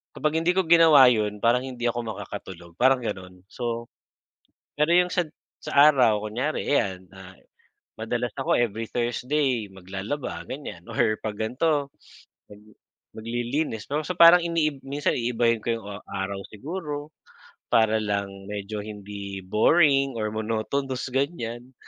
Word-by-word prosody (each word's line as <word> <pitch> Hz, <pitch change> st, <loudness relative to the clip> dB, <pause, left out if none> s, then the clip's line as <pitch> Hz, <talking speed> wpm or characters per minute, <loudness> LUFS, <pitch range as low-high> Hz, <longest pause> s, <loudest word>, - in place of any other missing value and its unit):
Kapag 155 Hz, +1 st, 0 dB
hindi 175 Hz, +2 st, +1 dB
ko 190 Hz, -, +3 dB
ginawa 160 Hz, -6 st, +7 dB
yun, 105 Hz, -3 st, -1 dB
parang 120 Hz, +2 st, +4 dB
hindi 125 Hz, -2 st, -7 dB
ako 120 Hz, -, -4 dB
makakatulog, 95 Hz, -4 st, -8 dB
parang 130 Hz, 0 st, +4 dB
ganun. 90 Hz, -4 st, -6 dB
So, 120 Hz, -1 st, -4 dB, 0.8 s
pero 150 Hz, +3 st, +2 dB
yung 180 Hz, +1 st, +5 dB
sa 180 Hz, 0 st, 0 dB, 0.4 s
sa -, -, -6 dB, 0.2 s
araw 115 Hz, -8 st, +3 dB
kunyari, 125 Hz, +8 st, -2 dB
ayan, 95 Hz, -9 st, 0 dB
ah, 95 Hz, 0 st, -13 dB, 0.6 s
madalas 120 Hz, +2 st, -2 dB
ako 135 Hz, -, 0 dB
every 115 Hz, -1 st, -1 dB
Thursday 125 Hz, -1 st, -1 dB
maglalaba 95 Hz, +8 st, -5 dB
ganyan 130 Hz, -11 st, -7 dB
or 115 Hz, -5 st, 0 dB
pag 105 Hz, -2 st, -4 dB
gan'to 140 Hz, +7 st, 0 dB, 0.6 s
mag 105 Hz, 0 st, -14 dB, 0.6 s
maglilinis 120 Hz, +2 st, -3 dB
'no. 150 Hz, +2 st, 0 dB
So 180 Hz, -, -3 dB
parang 170 Hz, +1 st, +9 dB
iniib 155 Hz, -5 st, 0 dB
minsan 140 Hz, +2 st, -1 dB
iibahin 115 Hz, -1 st, +1 dB
ko -, -, -4 dB
yung 115 Hz, -, -12 dB
o 100 Hz, 0 st, -7 dB
araw 95 Hz, 0 st, -4 dB
siguro 150 Hz, -, -6 dB, 0.6 s
para 110 Hz, -1 st, +4 dB
lang 100 Hz, -1 st, -1 dB, 0.2 s
medyo 105 Hz, +1 st, -5 dB
hindi 100 Hz, -2 st, -7 dB
boring 135 Hz, -, +3 dB
or 110 Hz, -1 st, -1 dB
monotonous, 115 Hz, +5 st, -2 dB
ganyan. 130 Hz, -3 st, -3 dB
120 Hz, 135 wpm, -25 LUFS, 105-145 Hz, 0.8 s, parang